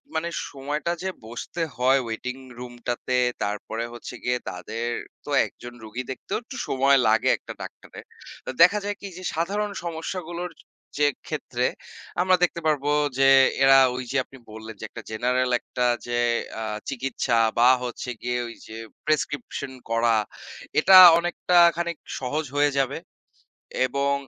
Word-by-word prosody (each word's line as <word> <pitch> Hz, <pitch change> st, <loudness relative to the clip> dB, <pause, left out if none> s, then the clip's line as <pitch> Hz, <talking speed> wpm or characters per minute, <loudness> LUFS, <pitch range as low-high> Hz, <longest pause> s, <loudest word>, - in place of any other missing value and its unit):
মানে 165 Hz, +2 st, -1 dB, 0.2 s
সময়টা 145 Hz, +4 st, -3 dB
যে 190 Hz, -, -1 dB, 0.2 s
বসতে 120 Hz, +9 st, -6 dB, 0.2 s
হয় 130 Hz, +2 st, +4 dB
waiting 125 Hz, +3 st, -5 dB, 0.2 s
room 125 Hz, -1 st, -8 dB
টাতে, 125 Hz, +1 st, -1 dB, 0.3 s
তারপরে 105 Hz, +2 st, -3 dB
হচ্ছে 120 Hz, -, -8 dB
গিয়ে 125 Hz, 0 st, +1 dB
তাদের 110 Hz, +6 st, -5 dB, 0.4 s
তো -, -, -9 dB, 0.2 s
একজন 120 Hz, 0 st, -11 dB
রোগী 110 Hz, +4 st, -5 dB
দেখতেও 195 Hz, +10 st, -4 dB
একটু 265 Hz, +3 st, -9 dB
সময় 135 Hz, +1 st, +4 dB
লাগে 110 Hz, 0 st, +3 dB
একটা -, -, -9 dB
ডাক্তারের। -, -, -10 dB, 0.4 s
তো -, -, -6 dB
দেখা 180 Hz, +5 st, +7 dB
যায় 205 Hz, 0 st, -2 dB
কি 200 Hz, -, -6 dB
যে 185 Hz, -, -9 dB
সাধারণ 200 Hz, +6 st, -1 dB
সমস্যাগুলোর 175 Hz, +1 st, -5 dB, 0.5 s
যে 145 Hz, 0 st, +4 dB, 0.2 s
ক্ষেত্রে, -, -, -1 dB, 0.5 s
আমরা 185 Hz, 0 st, +4 dB
দেখতে 170 Hz, -1 st, +1 dB
পারবো 145 Hz, -2 st, +1 dB, 0.3 s
যে 135 Hz, -, +6 dB, 0.4 s
এরা 135 Hz, 0 st, +8 dB, 0.2 s
ওই 130 Hz, -, -4 dB
যে 135 Hz, -, 0 dB
আপনি 135 Hz, -, -15 dB
বললেন 110 Hz, 0 st, -9 dB
যে -, -, -6 dB
একটা -, -, -9 dB
general 125 Hz, +3 st, 0 dB
একটা 125 Hz, -, -3 dB, 0.2 s
যে 120 Hz, 0 st, -1 dB, 0.4 s
আ -, -, -2 dB, 0.3 s
চিকিৎসা 130 Hz, -3 st, -1 dB, 0.2 s
বা 120 Hz, +1 st, +7 dB
হচ্ছে 125 Hz, 0 st, -5 dB
গিয়ে 125 Hz, 0 st, -1 dB
ওই 115 Hz, -, -9 dB
যে 110 Hz, -, -9 dB, 0.3 s
প্রেসক্রিপশন 145 Hz, -3 st, -2 dB, 0.2 s
করা, 115 Hz, 0 st, +3 dB, 0.6 s
এটা 185 Hz, +4 st, +8 dB, 0.2 s
অনেকটা 175 Hz, +1 st, 0 dB, 0.2 s
খানিক 170 Hz, -1 st, -2 dB, 0.2 s
সহজ 145 Hz, +4 st, -2 dB
হয়ে 145 Hz, 0 st, +4 dB
যাবে। 135 Hz, -2 st, 0 dB, 0.9 s
এবং 140 Hz, +2 st, 0 dB
135 Hz, 150 wpm, -25 LUFS, 120-170 Hz, 0.9 s, এরা